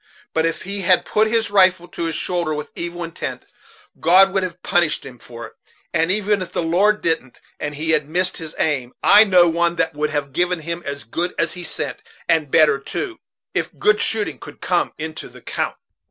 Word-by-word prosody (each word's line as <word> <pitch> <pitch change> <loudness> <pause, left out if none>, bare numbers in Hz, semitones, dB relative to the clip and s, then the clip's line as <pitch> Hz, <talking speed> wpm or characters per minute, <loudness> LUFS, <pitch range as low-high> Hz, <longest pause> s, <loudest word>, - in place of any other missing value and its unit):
But 160 +1 +2
if 165 - -4
he 200 +1 -4
had 185 0 +3
put 215 +1 +2
his 225 -1 0
rifle 185 -3 +4
to 170 - -4
his 165 -1 -2
shoulder 170 -4 -1
with 150 - -6
evil 175 0 -5
intent 165 0 -6 0.5
God 190 +3 +5
would 195 - +2
have 185 -2 -5
punished 175 -3 +1
him 125 -3 -11
for 115 -1 -10
it; 110 - -13 0.4
and 165 0 +2
even 205 +1 +1
if 185 - -6
the - - -1
Lord 200 +6 +2
didn't, 160 -6 -1 0.2
and 150 0 -4
he 160 +2 -1
had 150 -2 +1
missed 180 +3 +1
his 160 -3 -8
aim, 135 -6 -1
I 210 +2 +8
know 180 -4 +5
one 170 +1 +1
that 165 -1 0
would 150 +1 -1
have 145 -3 -3
given 180 +1 0
him 170 +2 -4
as 140 0 -5
good 170 +10 -3
as 165 -1 0
he 180 - -6
sent, 165 - -5 0.3
and 160 -3 +2
better 150 -1 +4
too, 350 - -5 0.3
if - - -3
good 210 0 +3
shooting 220 -2 0
could - - -12
come 180 -1 0
into 155 0 -6
the - - -14
'count." - - -3
170 Hz, 210 wpm, -20 LUFS, 155-185 Hz, 0.5 s, I